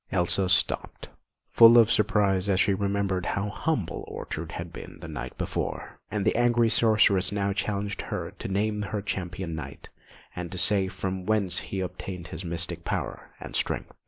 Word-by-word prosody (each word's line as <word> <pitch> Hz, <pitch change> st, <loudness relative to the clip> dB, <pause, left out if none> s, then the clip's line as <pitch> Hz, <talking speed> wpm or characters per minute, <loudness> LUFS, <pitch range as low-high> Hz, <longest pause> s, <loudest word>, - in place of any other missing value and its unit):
Elsa 95 Hz, +1 st, +2 dB
stopped, 90 Hz, -, 0 dB, 0.4 s
full 115 Hz, 0 st, +8 dB
of 115 Hz, -1 st, +6 dB
surprise 105 Hz, -3 st, +2 dB
as 95 Hz, -1 st, +2 dB
she 100 Hz, -, +3 dB
remembered 100 Hz, -1 st, 0 dB
how 100 Hz, +3 st, -1 dB
humble 105 Hz, -, -2 dB
Ortrud 80 Hz, +1 st, -6 dB
had 85 Hz, -1 st, -6 dB
been -, -, -9 dB
the -, -, -8 dB
night -, -, -6 dB
before; -, -, -4 dB
and 105 Hz, -2 st, -2 dB
the 110 Hz, -, +2 dB
angry 120 Hz, -1 st, +3 dB
sorceress 105 Hz, -4 st, +4 dB
now 100 Hz, -1 st, 0 dB
challenged 100 Hz, +1 st, -2 dB
her -, -, -3 dB
to -, -, -4 dB
name 105 Hz, +2 st, 0 dB
her 105 Hz, 0 st, -3 dB
Champion 90 Hz, -3 st, -4 dB
Knight, 70 Hz, -3 st, -8 dB, 0.5 s
and 90 Hz, -2 st, -5 dB
to 95 Hz, -, -5 dB
say 95 Hz, +1 st, +3 dB
from 95 Hz, 0 st, -4 dB
whence 100 Hz, -5 st, +2 dB
he 95 Hz, -, -4 dB
obtained 90 Hz, -1 st, -6 dB
his 80 Hz, +3 st, -6 dB
mystic 85 Hz, -1 st, -2 dB
power -, -, -4 dB
and -, -, -7 dB
strength. -, -, -1 dB
100 Hz, 170 wpm, -27 LUFS, 90-105 Hz, 0.5 s, full